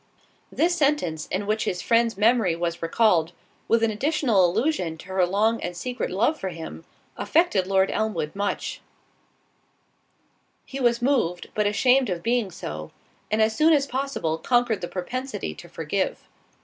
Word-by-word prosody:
This 345 +2 +2
sentence, 275 - 0
in 195 +2 -2
which 215 +1 0
his 180 - -2
friend's 230 -2 +2
memory 215 -5 +3
was 170 0 -3
recalled, 170 -1 +2 0.3
with 230 0 +3
an 225 - +3
additional 240 - +2
allusion 185 - -1
to - - -13
her 190 -1 +2
long 215 +5 +1
and 175 - -4
secret 250 +7 -3
love 235 - +1
for 190 - -3
him, 160 - -8 0.3
affected 260 - +2
Lord 190 0 +2
Elmwood 185 -8 -2
much—he 200 0 -2 2.0
was 240 -2 +2
moved, 235 -11 0
but 210 -1 +1
ashamed 250 +4 +3
of 175 -2 -3
being 235 -3 +1
so, 75 - -7 0.4
and 215 +1 +3
as 220 0 +1
soon 320 +4 +5
as 285 -2 +3
possible 260 - -2
conquered 240 -3 +1
the 175 - -3
propensity 255 +10 -4
to - - -13
forgive. - - -2
215 Hz, 150 wpm, -25 LUFS, 180-250 Hz, 2.0 s, soon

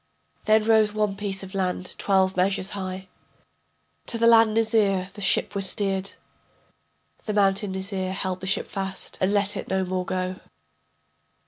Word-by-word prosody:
Then 215 0 +4
rose 215 -1 +3
one 210 -2 0
piece 195 -1 -4
of 190 +1 -10
land 185 -1 -2
twelve 190 -1 +2
measures 190 +1 0
high. 190 -1 -6 1.0
To 230 - -1
the 230 - +2
land 225 -2 +6
Nizir 210 -5 +2
the 205 - -10
ship 180 - +2
was 195 -2 +4
steered, 195 -1 -1 1.1
The 215 - -2
mountain 195 -1 +2
Nizir 190 -1 -3
held 190 -1 -2
the 190 - -5
ship 195 - +1
fast, 195 -1 -5
and 185 - +2
let 205 -1 +1
it - - -5
no 190 0 0
more 185 0 -2
go. 185 0 -2
195 Hz, 155 wpm, -24 LUFS, 190-210 Hz, 1.1 s, land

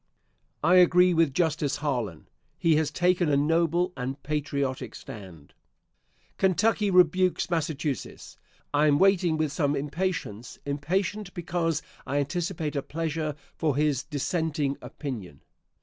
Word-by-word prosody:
I 180 +4 +5
agree 180 0 +6
with 165 -3 +3
Justice 155 -2 0
Harlan. 120 - -3 0.3
He 165 -2 +3
has 155 -2 +1
taken 180 -2 +2
a 140 - +3
noble 170 +4 +2
and 130 +1 -4
patriotic 140 -4 -2
stand. 90 -8 -11 0.9
Kentucky 205 +3 +2
rebukes 180 0 +3
Massachusetts! 150 -4 -3 0.3
I 150 +1 +4
am 145 -1 +4
waiting 180 -3 +3
with 155 -2 0
some 145 -1 0
impatience 145 - -3
impatient 180 +8 -2
because 170 -2 -1 0.2
I 140 +2 -1
anticipate 160 +1 -2
a 140 - 0
pleasure 155 0 -3 0.2
for 155 -5 0
his 145 -2 +1
dissenting 150 -1 -1
opinion. 105 - -7
155 Hz, 120 wpm, -27 LUFS, 140-175 Hz, 0.9 s, agree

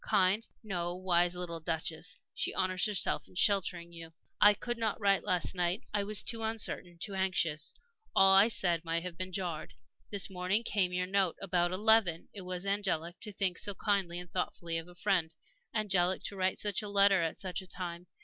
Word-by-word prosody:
Kind 195 +4 +2 0.2
no, 175 -4 -3
wise 175 -1 +2
little 175 -2 -5
Duchess! 165 0 -3 0.2
She - - -2
honors 185 +2 +1
herself 210 -3 0
in - - -20
sheltering 180 -3 +1
you. 165 -1 -10 0.3
"I 210 0 +8
could 240 +3 -4
not 220 -3 -1
write 200 -2 +3
last 180 -4 +1
night 180 +1 -1
I 205 -1 +1
was 210 0 +4
too 230 -1 +2
uncertain, 220 -5 -1
too 200 +4 -4
anxious. 185 -5 0 0.4
All 195 0 +6
I 195 +3 +7
said 175 -7 +2
might 165 0 -2
have 180 -1 -7
jarred. 180 -4 -4 0.3
This 200 -3 0
morning 185 +3 -1
came 195 -5 +1
your 180 0 -1
note, 190 -2 +1
about 175 -2 0
eleven. 200 -3 +3
It 200 - -7
was 180 0 -4
angelic 185 -4 -2
to 210 - -3
think 190 -2 -1
so 205 -1 -3
kindly 195 -5 0
and 180 0 -8
thoughtfully 170 -2 -2
of 165 - -10
a 180 - -15
friend 175 -4 0 0.4
angelic 190 -4 +1
to 200 - -3
write 185 0 0
such 205 -1 -1
a 210 - -7
letter 200 -2 +4
at 165 -1 -2
such 185 -1 -3
a 185 - -14
time. 175 -1 -7
185 Hz, 190 wpm, -31 LUFS, 175-200 Hz, 0.4 s, I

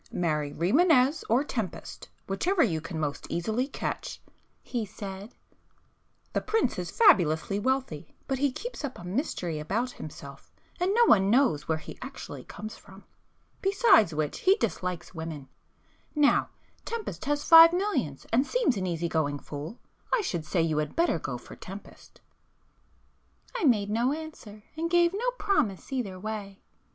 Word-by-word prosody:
'Marry 150 -4 -1
Rimânez 265 - +3
or 240 +5 +4
Tempest, 225 - -5 0.2
whichever 335 - +1
you 165 -9 0
can 160 0 -5
most 145 -2 -3
easily 220 +9 -1
catch,' 280 - -4 0.4
he 240 -3 -3
said—'The 200 +1 -10
prince 445 +1 0
is - - -4
fabulously 195 - +4
wealthy—but 260 - -2
he 285 -1 +2
keeps 475 - -7
up 275 -3 -4
a - - -10
mystery 180 - -2
about 220 +11 -1
himself 140 - -10 0.3
and 360 +2 +1
no 475 0 +6
one 195 - +5
knows 230 - +3
where 160 - +1
he 155 - -10
actually 265 +2 -8
comes 215 +1 -8
from,—besides 370 - 0
which 150 -1 -2
he 380 +1 +5
dislikes 180 - -3
women;—now 165 - -2 0.3
Tempest 465 -2 -5
has 290 0 0
five 330 0 +10
millions 335 - -1
and 260 +5 +3
seems - - +2
an 185 -1 -2
easy 170 -1 -1
going 155 -3 0
fool,—I 155 - -5
should 170 - -3
say 165 +1 +1
you 155 -2 +1
had 150 - -3
better 335 - +2
go 135 -4 -4
for - - -12
Tempest.' 195 +2 -12 1.3
I 460 - 0
made 210 -6 +3
no 240 +5 +2
answer 295 -10 -9
and 330 +1 -2
gave 345 0 +4
no 470 +5 0
promise 225 - 0
either 200 -8 -3
way. 205 -1 -6
215 Hz, 145 wpm, -28 LUFS, -, 1.3 s, five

